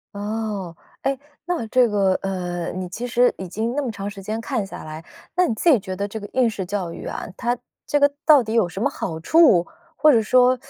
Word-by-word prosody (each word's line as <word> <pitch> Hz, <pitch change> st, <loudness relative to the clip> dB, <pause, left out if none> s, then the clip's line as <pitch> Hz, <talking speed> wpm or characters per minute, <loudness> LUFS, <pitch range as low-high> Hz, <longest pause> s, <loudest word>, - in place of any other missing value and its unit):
哦， 205 Hz, -4 st, -3 dB, 0.3 s
哎， 270 Hz, 0 st, 0 dB, 0.3 s
那 335 Hz, -9 st, -2 dB
这 245 Hz, +1 st, +4 dB
个， 195 Hz, -2 st, +2 dB
呃， 175 Hz, -3 st, -3 dB
你 185 Hz, 0 st, -4 dB
其 230 Hz, +7 st, -5 dB
实 245 Hz, +1 st, +3 dB
已 185 Hz, -2 st, -6 dB
经 225 Hz, +6 st, -2 dB
那 290 Hz, -, +1 dB
么 240 Hz, -, -2 dB
长 200 Hz, -1 st, -5 dB
时 200 Hz, -2 st, -10 dB
间 215 Hz, +3 st, -3 dB
看 230 Hz, -4 st, -2 dB
下 190 Hz, -, -9 dB
来， 155 Hz, +1 st, -8 dB, 0.3 s
那 360 Hz, 0 st, +4 dB
你 230 Hz, -, 0 dB
自 335 Hz, -, +2 dB
己 270 Hz, -, +7 dB
觉 190 Hz, -2 st, -6 dB
得 200 Hz, +2 st, -2 dB
这 220 Hz, +1 st, -6 dB
个 205 Hz, -, -8 dB
应 250 Hz, -2 st, +3 dB
试 195 Hz, -4 st, -4 dB
教 190 Hz, -2 st, -3 dB
育 -, -, -8 dB
啊， -, -, -5 dB
它 240 Hz, 0 st, -1 dB, 0.3 s
这 290 Hz, -, +1 dB
个 285 Hz, 0 st, +5 dB, 0.2 s
到 300 Hz, -4 st, +7 dB
底 220 Hz, -1 st, -4 dB
有 220 Hz, -7 st, +3 dB
什 195 Hz, -, -6 dB
么 275 Hz, -, +2 dB
好 165 Hz, -, -5 dB
处？ 200 Hz, -, +5 dB, 0.3 s
或 305 Hz, +2 st, +6 dB
者 225 Hz, -, +5 dB
说 250 Hz, +3 st, +4 dB
215 Hz, 250 characters per minute, -22 LUFS, 190-250 Hz, 0.3 s, 己